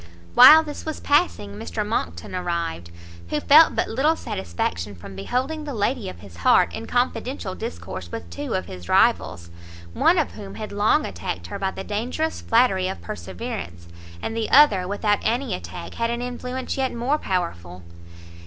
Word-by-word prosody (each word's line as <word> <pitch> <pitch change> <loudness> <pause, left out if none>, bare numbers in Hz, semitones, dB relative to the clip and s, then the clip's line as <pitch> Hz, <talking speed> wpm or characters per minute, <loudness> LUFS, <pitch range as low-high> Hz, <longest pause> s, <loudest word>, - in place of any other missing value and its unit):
While 315 - +10
this 295 -2 -7
was 315 -1 -5
passing, 290 - +1
Mr 85 -3 -4
Monckton 85 - -3
arrived; 170 - -3 0.4
who 150 - 0
felt 310 - +6
but - - 0
little 290 +8 +2
satisfaction 85 - -4
from 95 +2 -11
beholding 260 - -2
the 290 -4 -5
lady 215 0 -1
of - - -11
his 95 -4 -13
heart 90 - +4
in - - -6
confidential - - -1
discourse 85 +1 -7
with 85 - -6
two 85 - -4
of 95 - -2
his 90 0 -10
rivals, 85 0 +2 0.4
one 350 - +3
of 315 - +1
whom 200 -2 -9
had 215 -1 -6
long 205 +1 +2
attacked 85 -1 -5
her 85 - -6
by 195 - 0
the 190 - -7
dangerous 250 +11 -2
flattery 225 -6 +3
of 190 - -4
perseverance, 215 - -7 0.4
and 225 - -3
the 225 -1 -2
other, 210 -11 +6
without 205 +1 +1
any 240 -1 -1
attack, 85 -1 -7
had 230 0 -1
an 235 +1 -2
influence 250 +1 -4
yet 265 -1 0
more 250 +6 0
powerful. 90 - -3
200 Hz, 170 wpm, -23 LUFS, -, 0.4 s, While